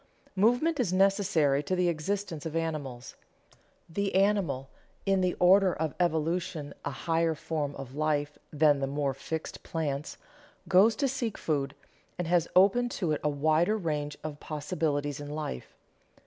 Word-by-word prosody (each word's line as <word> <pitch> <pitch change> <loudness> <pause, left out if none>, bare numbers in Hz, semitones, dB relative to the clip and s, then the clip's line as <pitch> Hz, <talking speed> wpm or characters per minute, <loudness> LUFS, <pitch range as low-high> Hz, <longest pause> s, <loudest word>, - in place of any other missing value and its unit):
Movement 245 - +3
is 220 -8 +1
necessary 185 -7 +3
to 185 +6 -1
the 180 -1 +2
existence 170 0 -2
of 160 - -6
animals. 145 -7 -4 0.7
The 200 +4 -2
animal, 190 -10 +2 0.4
in 195 -1 +2
the 180 -1 +1
order 185 +1 +5
of 155 -2 -2
evolution 165 -2 -1
a - - -2
higher 165 +3 0
form 150 -2 -3
of 135 -2 -8
life 150 0 -1
than 150 -1 +4
the 135 - -1
more 140 0 -1
fixed 160 +4 -5
plants, 150 -3 -3 0.5
goes 205 +5 +5
to 275 - +1
seek 245 -5 -2
food, 140 -3 -1 0.4
and 175 -1 -2
has 170 -1 +2
open 205 +7 +5
to 175 -6 0
it 150 - -1
a 150 - +2
wider 155 +8 +2
range 150 -6 -3
of 150 -1 -6
possibilities 150 -2 -2
in 145 0 -7
life. 150 - -5
160 Hz, 150 wpm, -29 LUFS, 145-185 Hz, 0.7 s, order